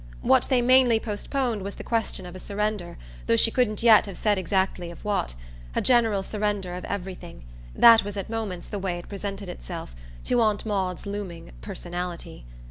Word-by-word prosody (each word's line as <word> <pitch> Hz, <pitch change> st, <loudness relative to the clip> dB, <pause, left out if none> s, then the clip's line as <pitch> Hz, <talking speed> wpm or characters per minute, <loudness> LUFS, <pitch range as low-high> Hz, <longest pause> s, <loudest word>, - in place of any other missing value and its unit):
What -, -, +4 dB
they 250 Hz, -2 st, +3 dB
mainly 250 Hz, -2 st, +5 dB
postponed 230 Hz, +1 st, -2 dB
was 200 Hz, +1 st, -5 dB
the -, -, -8 dB
question 225 Hz, -5 st, -1 dB
of 180 Hz, 0 st, -9 dB
a -, -, -7 dB
surrender, 205 Hz, -2 st, -3 dB, 0.3 s
though -, -, +4 dB
she 225 Hz, -, +4 dB
couldn't 230 Hz, -4 st, +1 dB
yet 220 Hz, -3 st, +7 dB
have 195 Hz, -, -7 dB
said 205 Hz, -3 st, +1 dB
exactly 185 Hz, -1 st, -1 dB
of 170 Hz, -, -12 dB
what: 200 Hz, -, -1 dB, 0.4 s
a -, -, +2 dB
general 225 Hz, -6 st, +3 dB
surrender 205 Hz, -3 st, -2 dB
of 180 Hz, -, -6 dB
everything 185 Hz, -, -6 dB, 0.3 s
that 230 Hz, -1 st, +8 dB
was 205 Hz, 0 st, -6 dB
at 195 Hz, -, -4 dB
moments 215 Hz, -6 st, -4 dB
the 205 Hz, -, -4 dB
way 185 Hz, -2 st, -2 dB
it 175 Hz, -, -9 dB
presented 200 Hz, 0 st, -5 dB
itself -, -, -7 dB, 0.3 s
to 245 Hz, -, +2 dB
Aunt 215 Hz, -1 st, +1 dB
Maud's 190 Hz, -4 st, -2 dB
looming 200 Hz, -, -6 dB
"personality." 175 Hz, -, -6 dB
200 Hz, 180 wpm, -26 LUFS, 180-220 Hz, 0.4 s, that